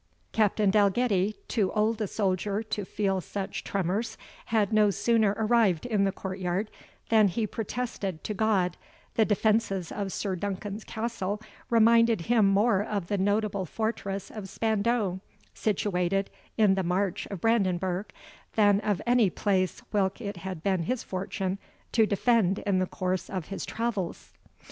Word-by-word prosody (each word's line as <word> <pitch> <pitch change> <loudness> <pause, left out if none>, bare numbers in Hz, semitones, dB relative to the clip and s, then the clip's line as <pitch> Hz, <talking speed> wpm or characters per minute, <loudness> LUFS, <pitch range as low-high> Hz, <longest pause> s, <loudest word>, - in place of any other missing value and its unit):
Captain 210 -2 +2
Dalgetty, 205 0 +2
too 205 -6 +1
old 220 +1 +1
a 210 - 0
soldier 200 +1 -1
to 210 -2 -3
feel 195 -1 -1
such 195 +3 -5
tremors, 200 +4 -2 0.3
had 220 -2 +1
no 210 -1 +5
sooner 210 +1 +2
arrived 220 -6 +2
in 210 -5 +2
the 195 - +1
court 190 0 -6
yard, 185 +4 -1 0.4
than 220 -2 +6
he 215 +4 -1
protested 210 -5 -4
to 210 - -3
God, 195 -4 +1 0.4
the 220 - +3
defences 210 -4 +1
of 200 -2 -3
Sir 195 -1 -2
Duncan's 200 +3 -4
castle 220 -3 -3 0.3
reminded 230 -2 +5
him 220 +2 +3
more 200 +1 +3
of 205 -4 -3
the 205 - +1
notable 205 -1 0
fortress 200 -2 -3
of 205 -3 -7
Spandau, 220 -3 0 0.3
situated 195 -2 0 0.3
in 210 -3 +5
the 190 - +1
March 180 +1 -1
of 200 - -6
Brandenburg, 190 -3 +1 0.4
than 205 -2 +5
of 205 -3 -1
any 240 -4 +4
place 185 -1 0
whilk 195 0 +1
it 200 -5 -5
had 185 -2 -6
been 190 -3 +1
his 245 +9 -2
fortune 190 0 -3 0.3
to 220 -2 +4
defend 205 -2 +2
in 195 -2 0
the 185 - 0
course 185 0 -2
of 185 -5 -4
his 195 - -5
travels. 225 -6 -3
200 Hz, 150 wpm, -28 LUFS, 190-220 Hz, 0.4 s, than